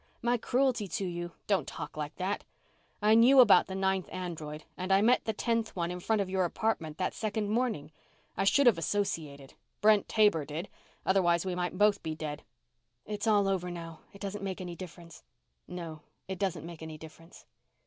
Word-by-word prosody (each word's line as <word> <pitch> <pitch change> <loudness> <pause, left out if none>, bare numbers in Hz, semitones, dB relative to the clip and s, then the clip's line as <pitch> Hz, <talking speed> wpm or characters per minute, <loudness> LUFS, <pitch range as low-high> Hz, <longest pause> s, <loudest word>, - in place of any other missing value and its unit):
My 240 +1 +3
cruelty 245 -2 +1
to 185 +3 -3
you 175 -1 -4
" - - -44
"Don't 190 -8 +1
talk 150 - -7
like 150 -1 -5
that! 190 +2 -2 0.6
I 215 +1 +6
knew 245 +4 +7
about 210 -7 +7
the 190 - -5
ninth 190 -1 0
android, 155 -4 -5
and 185 +1 -4
I 195 - +6
met 245 +3 +4
the 220 - +1
tenth 230 +1 -1
one 170 -1 -1
in 180 - -5
front 215 +3 +1
of - - -8
your 190 0 +1
apartment 170 -4 -1
that 185 - -1
second 215 -1 -2
morning. 220 - -1 0.4
I - - 0
should 280 +8 +4
have 225 -9 +5
associated. 155 -7 -2 0.3
Brent 210 -1 +4
Taber 210 -8 +4
did, 155 +6 -5 0.4
otherwise 175 -2 +3
we 185 - -1
might 180 0 -2
both 205 0 +4
be 160 -1 -4
dead." 150 -1 -5 0.6
"It's 210 +1 -4
all 205 -2 +4
over 185 -2 0
now. 165 -2 -7
It 200 - -15
doesn't 200 0 -4
make 190 -2 -3
any 180 -2 -6
difference." 170 -2 -10 0.5
"No, 165 -3 -7 0.3
it 190 -2 -5
doesn't 180 -5 -1
make 170 -1 -9
any 160 -1 -7
difference." 160 +2 -14
185 Hz, 190 wpm, -30 LUFS, 165-210 Hz, 0.6 s, knew